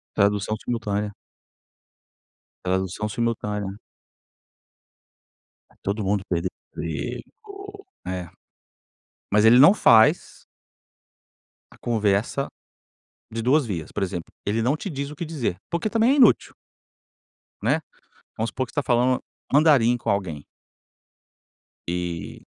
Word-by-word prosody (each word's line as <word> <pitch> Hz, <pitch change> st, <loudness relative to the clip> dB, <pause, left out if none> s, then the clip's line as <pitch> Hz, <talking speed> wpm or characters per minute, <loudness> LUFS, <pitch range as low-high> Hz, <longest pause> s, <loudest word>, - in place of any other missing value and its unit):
Tradução 100 Hz, +1 st, +2 dB
simultânea. 105 Hz, -3 st, -2 dB, 1.5 s
Tradução 95 Hz, +3 st, -1 dB
simultânea. 105 Hz, -3 st, -2 dB, 1.9 s
Está -, -, -26 dB
todo 100 Hz, +2 st, -2 dB
mundo 100 Hz, 0 st, 0 dB
perdendo 85 Hz, 0 st, 0 dB, 0.3 s
o -, -, -4 dB
emprego. 400 Hz, -1 st, -7 dB, 0.2 s
É. 90 Hz, -2 st, -4 dB, 1.0 s
Mas 105 Hz, +2 st, +4 dB
ele 120 Hz, +2 st, +8 dB
não 155 Hz, +10 st, +8 dB
faz 110 Hz, -, +4 dB, 1.3 s
a -, -, -17 dB
conversa, 110 Hz, +3 st, 0 dB, 0.8 s
de 115 Hz, -, -3 dB
2 130 Hz, +4 st, +3 dB
vias, 85 Hz, -8 st, -5 dB
por 105 Hz, -, -2 dB
exemplo, 90 Hz, -3 st, -4 dB
ele 105 Hz, +3 st, 0 dB
não 130 Hz, +7 st, +1 dB
te 195 Hz, -, -5 dB
diz 140 Hz, -3 st, -4 dB
o 150 Hz, -, -9 dB
que 170 Hz, -, -5 dB
dizer, 150 Hz, -, -2 dB
porque 170 Hz, +5 st, -1 dB
também 230 Hz, +3 st, +3 dB
é 280 Hz, -, +4 dB
inútil. 250 Hz, -7 st, +4 dB, 1.1 s
Né, -, -, +1 dB, 0.6 s
vamos 110 Hz, +1 st, -1 dB
supor 130 Hz, -, -2 dB
que -, -, -17 dB
você 145 Hz, -, 0 dB
está -, -, -4 dB
falando 125 Hz, 0 st, +2 dB, 0.3 s
mandarim 140 Hz, -5 st, +5 dB
com 120 Hz, -, -3 dB
alguém. 90 Hz, -8 st, -2 dB, 1.4 s
E 85 Hz, -1 st, -4 dB
110 Hz, 115 wpm, -24 LUFS, 100-140 Hz, 1.9 s, ele